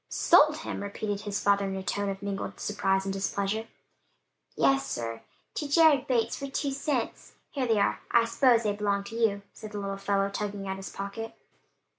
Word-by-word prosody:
"Sold 305 Hz, -3 st, +5 dB
him?" 315 Hz, -, -5 dB
repeated 200 Hz, 0 st, -3 dB
his 205 Hz, -1 st, -2 dB
father 200 Hz, 0 st, +3 dB
in 195 Hz, 0 st, -3 dB
a 190 Hz, -, -4 dB
tone 200 Hz, +1 st, -1 dB
of 195 Hz, 0 st, -5 dB
mingled 200 Hz, -1 st, -4 dB
surprise 195 Hz, -2 st, 0 dB
and 195 Hz, -, -2 dB
displeasure. 200 Hz, +3 st, -1 dB, 0.9 s
"Yes, 270 Hz, 0 st, +3 dB
sir: 115 Hz, -1 st, -4 dB, 0.3 s
to 295 Hz, -, -3 dB
Jared 295 Hz, -3 st, +5 dB
Bates, 230 Hz, -3 st, +1 dB
for 275 Hz, -, -5 dB
two 275 Hz, +1 st, -2 dB
cents. 270 Hz, -3 st, -2 dB, 0.2 s
Here 265 Hz, -3 st, -1 dB
they 225 Hz, -2 st, +3 dB
are: 200 Hz, -, +2 dB
I 235 Hz, -1 st, +4 dB
s'pose 235 Hz, 0 st, +4 dB
they 210 Hz, -1 st, +1 dB
belong 200 Hz, -1 st, 0 dB
to 215 Hz, +3 st, -9 dB
you," 210 Hz, -3 st, +1 dB
said 215 Hz, -1 st, -10 dB
the -, -, -4 dB
little 195 Hz, -1 st, -3 dB
fellow 195 Hz, 0 st, +1 dB
tugging 200 Hz, -1 st, -4 dB
at 190 Hz, 0 st, -3 dB
his 195 Hz, -, -7 dB
pocket. 200 Hz, +3 st, -6 dB
205 Hz, 190 wpm, -28 LUFS, 195-235 Hz, 0.9 s, Sold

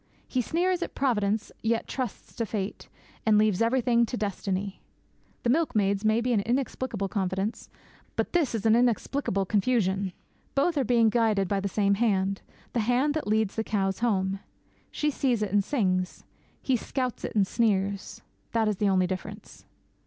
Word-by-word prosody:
He 255 Hz, -, 0 dB
sneers 355 Hz, +7 st, 0 dB
at -, -, -4 dB
'Providence,' 215 Hz, -5 st, 0 dB
yet 225 Hz, 0 st, 0 dB
trusts 255 Hz, -6 st, -5 dB
to 230 Hz, -, 0 dB
'fate,' 200 Hz, -2 st, -4 dB, 0.3 s
and 215 Hz, -1 st, +4 dB
leaves 210 Hz, -2 st, +3 dB
everything 235 Hz, 0 st, +3 dB
to 245 Hz, -, -4 dB
'destiny'! 200 Hz, -2 st, -3 dB, 0.6 s
The 235 Hz, -, +3 dB
milkmaid's 210 Hz, -10 st, +1 dB
may 220 Hz, +2 st, +3 dB
be 245 Hz, +1 st, +1 dB
an 215 Hz, -, +3 dB
inexplicable 240 Hz, -3 st, -1 dB
confidence; 190 Hz, +2 st, -2 dB, 0.5 s
but -, -, -1 dB
this 320 Hz, -9 st, +2 dB
is 220 Hz, -1 st, -3 dB
an 220 Hz, 0 st, +6 dB
inexplicable 240 Hz, -3 st, +1 dB
confusion. 195 Hz, -2 st, +1 dB, 0.4 s
Both 305 Hz, +5 st, +2 dB
are 280 Hz, -, +2 dB
being 230 Hz, -2 st, +4 dB
guided 215 Hz, -5 st, +2 dB
by 200 Hz, +1 st, 0 dB
the 200 Hz, +1 st, -2 dB
same 200 Hz, 0 st, +2 dB
Hand 195 Hz, -3 st, +1 dB, 0.3 s
the 240 Hz, -, +1 dB
Hand 250 Hz, +6 st, +2 dB
that 310 Hz, -6 st, -3 dB
leads 215 Hz, -1 st, +1 dB
the 220 Hz, -, -1 dB
cows 195 Hz, -3 st, -1 dB
home. 195 Hz, -4 st, 0 dB, 0.5 s
She 300 Hz, 0 st, 0 dB
sees 250 Hz, -6 st, +1 dB
it 200 Hz, -, -3 dB
and 205 Hz, 0 st, +3 dB
sings. 185 Hz, -8 st, -1 dB, 0.4 s
He 265 Hz, -, +2 dB
scouts 255 Hz, +1 st, -3 dB
it -, -, -4 dB
and 205 Hz, -2 st, +4 dB
sneers. 200 Hz, -2 st, 0 dB, 0.3 s
That 225 Hz, -1 st, +2 dB
is 210 Hz, -2 st, 0 dB
the 205 Hz, 0 st, +2 dB
only 185 Hz, -1 st, +3 dB
difference. 185 Hz, +1 st, -7 dB
215 Hz, 165 wpm, -27 LUFS, 195-245 Hz, 0.6 s, an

